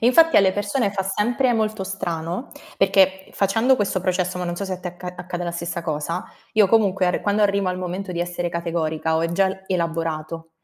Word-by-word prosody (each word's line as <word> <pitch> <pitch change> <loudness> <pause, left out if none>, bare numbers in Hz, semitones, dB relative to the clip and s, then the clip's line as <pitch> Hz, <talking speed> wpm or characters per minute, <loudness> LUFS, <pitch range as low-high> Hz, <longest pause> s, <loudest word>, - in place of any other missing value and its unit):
E 230 - +3
infatti 330 +6 +6
alle 190 -2 +6
persone 205 +2 0
fa 195 - -1
sempre 240 +7 +1
molto 215 -2 0
strano, 175 +1 -4 0.3
perché 190 -1 +3
facendo 225 +7 +3
questo 200 -5 0
processo, 185 -1 0
ma 180 - -3
non 175 0 -2
so 200 +3 -4
se 190 - -2
a - - -8
te 180 - -4
acca 175 +1 -10
accade 180 0 -5
la 170 - -2
stessa 170 0 -4
cosa, 160 +3 -2 0.3
io 215 -2 +5
comunque 195 -4 +3
arr 180 - +1
quando 205 +1 +1
arrivo 200 -2 +2
al 180 - -2
momento 185 +1 -4
di 170 - -2
essere 175 0 -2
categorica, 160 -2 -1
ho 160 - +1
e 165 - -1
gial 190 +1 +1
elaborato. 165 -2 -2
185 Hz, 210 wpm, -22 LUFS, 170-200 Hz, 0.3 s, infatti